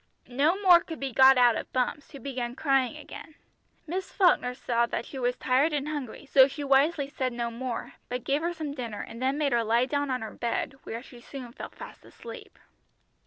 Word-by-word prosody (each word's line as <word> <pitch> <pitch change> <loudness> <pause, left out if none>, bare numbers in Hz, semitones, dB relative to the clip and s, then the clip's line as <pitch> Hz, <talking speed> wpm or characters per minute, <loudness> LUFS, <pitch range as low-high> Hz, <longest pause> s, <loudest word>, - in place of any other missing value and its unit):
No 295 +9 +2
more 355 -3 +8
could 325 -1 -8
be 270 -2 -4
got 265 +1 +7
out 245 -2 +5
of - - -5
Bumps, 255 +3 -1
who 280 - -10
began 250 -2 -4
crying 270 -1 +1
again. 305 0 -11 0.5
Miss 370 +4 -4
Falkner 300 -10 +3
saw 235 -2 0 0.2
she 270 - -8
was 245 0 0
tired 270 +5 +2
and 290 0 -1
hungry, 290 -3 -5
so 270 -1 +6
she 285 +1 -6
wisely 280 +2 +3
said 260 -2 -2
no 235 -1 -3
more, 240 0 -5 0.2
but 250 0 -3
gave 280 +2 0
her 340 +1 -1
some 315 -4 -5
dinner, 235 -6 -5
and 230 +2 -9
then 265 +2 +1
made 295 -2 +1
her 235 -1 +2
lie 230 +3 +2
down 285 +1 -1
on 255 -3 -1
her 220 - -7
bed, 235 +3 -2
where 230 +2 -6
she 245 -2 -14
soon 255 -2 -9
fell - - -7
fast - - -12
asleep. - - -11
265 Hz, 210 wpm, -28 LUFS, 245-290 Hz, 0.5 s, more